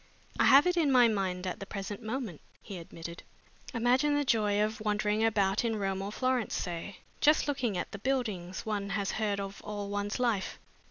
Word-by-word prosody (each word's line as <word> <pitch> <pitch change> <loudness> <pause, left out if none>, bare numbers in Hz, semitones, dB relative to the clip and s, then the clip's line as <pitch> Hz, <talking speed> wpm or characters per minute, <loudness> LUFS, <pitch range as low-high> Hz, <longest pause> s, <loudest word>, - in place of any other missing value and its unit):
"I - - +5
have 275 +3 +8
it 360 0 +2
in 305 -5 +3
my 250 -2 +7
mind 190 -4 -1
at 180 - -3
the 195 - -7
present 200 +2 -5
moment," 220 - -4 0.2
he 195 -4 -8
admitted. 170 0 -8 0.5
"Imagine 255 +4 +2
the 290 0 +1
joy 210 -4 +2
of 215 0 -2
wandering 210 0 +1
about 205 -2 +2
in 230 -2 0
Rome 195 -2 -1
or 200 +1 -4
Florence, 255 -1 0
say, 175 +2 -4 0.2
just 305 +1 +4
looking 250 -9 -1
at - - -3
the 200 - -7
buildings 210 -8 -2
one 205 -2 -2
has 200 -1 -1
heard 210 -2 -1
of 195 0 -6
all 205 -1 -5
one's 205 +3 -2
life! 230 -6 0
210 Hz, 195 wpm, -30 LUFS, 195-245 Hz, 0.5 s, have